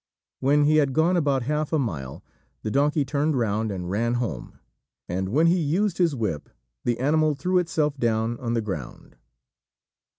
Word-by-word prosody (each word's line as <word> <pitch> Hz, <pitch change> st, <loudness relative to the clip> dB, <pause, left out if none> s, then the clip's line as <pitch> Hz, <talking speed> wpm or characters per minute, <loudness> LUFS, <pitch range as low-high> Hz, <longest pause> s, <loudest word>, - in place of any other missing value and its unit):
When 145 Hz, +2 st, +3 dB
he 155 Hz, +1 st, +4 dB
had 140 Hz, -3 st, +2 dB
gone 165 Hz, +5 st, +3 dB
about 140 Hz, -6 st, +1 dB
half 150 Hz, +3 st, -1 dB
a 160 Hz, -, +2 dB
mile, 80 Hz, -, -4 dB, 0.4 s
the 110 Hz, -, -2 dB
donkey 145 Hz, +2 st, +2 dB
turned 145 Hz, +2 st, 0 dB
round 110 Hz, -2 st, 0 dB
and 90 Hz, -2 st, -5 dB
ran 115 Hz, +4 st, 0 dB
home; 105 Hz, -, -4 dB, 0.5 s
and 95 Hz, +2 st, -2 dB
when 150 Hz, +10 st, +3 dB
he 175 Hz, +2 st, +4 dB
used 175 Hz, +5 st, 0 dB
his 170 Hz, -5 st, +2 dB
whip, 105 Hz, -, -3 dB, 0.3 s
the 120 Hz, -1 st, 0 dB
animal 155 Hz, +3 st, +2 dB
threw 180 Hz, +6 st, +1 dB
itself 155 Hz, -4 st, 0 dB
down 115 Hz, 0 st, 0 dB
on 120 Hz, -1 st, -2 dB
the 115 Hz, -, +1 dB
ground. 80 Hz, -, -7 dB
135 Hz, 170 wpm, -25 LUFS, 110-155 Hz, 0.5 s, he